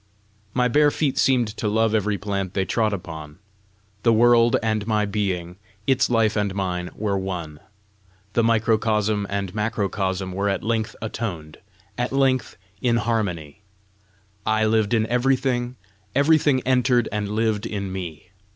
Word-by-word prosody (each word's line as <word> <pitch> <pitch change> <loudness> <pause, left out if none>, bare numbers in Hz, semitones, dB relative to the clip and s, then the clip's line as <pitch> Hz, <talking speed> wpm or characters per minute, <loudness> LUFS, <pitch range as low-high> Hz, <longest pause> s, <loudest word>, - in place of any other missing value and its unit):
My 125 -1 +3
bare 150 +4 +4
feet 145 -2 -1
seemed 125 -4 +3
to 110 - -2
love 110 +1 +2
every 105 -1 +1
plant 100 -2 -3
they 95 - +1
trod 110 0 +1
upon. 80 -6 -7 0.6
The 115 - +4
world 120 +1 +5
and 110 -1 -1
my 105 -2 +2
being, 95 -4 -2 0.3
its 135 -2 +2
life 115 -3 +2
and 100 -2 -1
mine, 90 -2 -2
were 100 -2 -1
one. 85 -6 -5 0.7
The 115 - +3
microcosm 110 -2 +1
and 100 -2 -3
macrocosm 100 -3 -1
were 100 +2 -1
at 95 -2 -2
length 110 0 -1
atoned, 90 -9 -5 0.4
at 125 - -1
length 135 -1 +1 0.2
in 120 -2 +2
harmony! 100 -9 -2 0.8
I 110 0 +2
lived 110 0 +2
in 110 -1 +2
everything; 125 0 0 0.4
everything 145 -1 +4
entered 125 -2 +2
and 105 -1 -2
lived 110 0 0
in 100 -3 -4
me. 90 -4 -7
110 Hz, 140 wpm, -23 LUFS, 100-120 Hz, 0.8 s, world